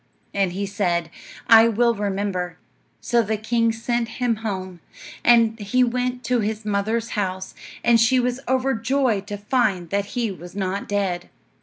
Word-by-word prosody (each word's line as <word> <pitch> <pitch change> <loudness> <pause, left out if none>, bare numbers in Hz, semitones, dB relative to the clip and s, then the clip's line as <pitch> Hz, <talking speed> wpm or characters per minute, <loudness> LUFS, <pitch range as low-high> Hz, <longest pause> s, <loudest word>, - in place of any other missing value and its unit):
And 195 -3 +1
he 200 +2 -2
said, 175 -5 -1 0.3
"I 225 0 +8
will 235 +1 +2
remember." 195 -3 -2 0.4
So 240 -1 +2
the 220 0 -1
king 230 +1 +1
sent 230 +1 -1
him 245 -3 +1
home, 190 -5 -5 0.4
and 230 -1 +4
he 235 +5 +2
went 250 +1 -1
to 250 0 +1
his 215 0 -2
mother's 215 +3 -1
house, 190 -2 -3 0.3
and 235 -1 +5
she 245 +3 +4
was 250 +1 -1
overjoyed 255 -4 +1
to 205 -1 -4
find 205 -5 0
that 200 0 0
he 230 -4 0
was 175 0 -10
not 195 0 -3
dead. 195 -4 -1
220 Hz, 155 wpm, -23 LUFS, 195-235 Hz, 0.4 s, I